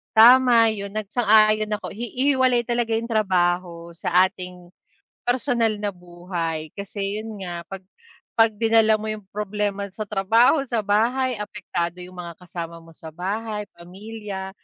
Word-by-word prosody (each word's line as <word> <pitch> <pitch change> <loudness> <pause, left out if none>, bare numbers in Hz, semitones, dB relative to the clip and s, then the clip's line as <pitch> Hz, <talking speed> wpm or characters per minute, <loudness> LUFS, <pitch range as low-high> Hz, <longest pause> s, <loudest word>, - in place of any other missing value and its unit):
Tama 240 0 +7
yun, 200 -2 -3
nag 215 -1 -4
sang-ayon 215 -1 +3
ako, 210 - -3
hi 235 -1 -5
hihiwalay 255 -3 +2
talaga 240 -1 0
yung 225 +1 0
trabaho 175 -5 0
sa 180 +2 +3
ating 180 -2 -10 0.5
personal 240 -3 0
na 205 -1 -3
buhay, 175 -3 -5
kasi 200 +1 -4
yun 215 -4 -7
nga, 175 -1 -5
pag 195 -1 -8 0.5
pag 225 -1 +5
dinala 225 -1 +4
mo 215 - -7
yung 215 -1 -4
problema 205 -1 -2
sa 215 - -8
trabaho 225 +8 +3
sa 235 -3 -1
bahay, 235 +4 +1
apektado 180 -4 -4
yung 180 0 -11
mga 170 -1 -8
kasama 170 -1 -7
mo 165 - -17
sa 160 -1 -11
bahay, 210 +4 -4
pamilya. 195 +2 -7
210 Hz, 150 wpm, -23 LUFS, 180-225 Hz, 0.5 s, Tama